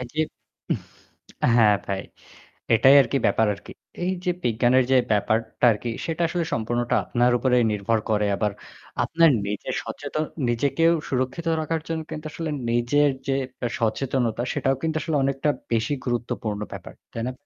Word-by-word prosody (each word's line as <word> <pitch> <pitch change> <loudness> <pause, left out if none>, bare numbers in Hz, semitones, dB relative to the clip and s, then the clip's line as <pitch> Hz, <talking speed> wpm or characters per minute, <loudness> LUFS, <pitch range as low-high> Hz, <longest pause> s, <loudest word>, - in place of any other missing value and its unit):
এ - - -4
যে 155 - -1 1.4
হ্যাঁ 110 -3 +6
ভাই। 95 -1 -2 0.7
এটাই 135 +5 +6
আরকি 140 - 0
ব্যাপার 110 - +3
আরকি। 100 - -12 0.3
এই 185 - +1
যে 180 - +3
বিজ্ঞানের 120 +2 +3
যে 130 - +6
ব্যাপারটা 110 +3 +1
আরকি 115 +2 -3 0.2
সেটা 165 +1 -2
আসলে 170 0 -1
সম্পূর্ণটা 120 +1 0
আপনার 120 0 +2
উপরে 125 0 +2
নির্ভর 105 +2 0
করে। 105 -1 +2
আবার 105 +1 0 0.5
আপনার 165 0 +4 0.2
নিজের 105 0 -3
সচেতন 155 0 -4 0.2
নিজেকেও 145 +8 +2 0.2
সুরক্ষিত 130 +6 -2
রাখার 160 +1 -2
জন্য 165 -1 -2
কিন্তু 155 0 -6
আসলে 165 -1 -4 0.2
নিজের 130 +5 +3 0.2
যে 135 - +2 0.5
সচেতনতা 120 0 0
সেটাও 135 0 +1
কিন্তু 160 -1 -1
আসলে 155 +1 -2
অনেকটা 135 +2 0 0.2
বেশি 115 +5 +1
গুরুত্বপূর্ণ 115 -3 -2
ব্যাপার। - - -8 0.2
তাই 115 - -4
না? 130 - -2
125 Hz, 150 wpm, -24 LUFS, 115-150 Hz, 1.4 s, হ্যাঁ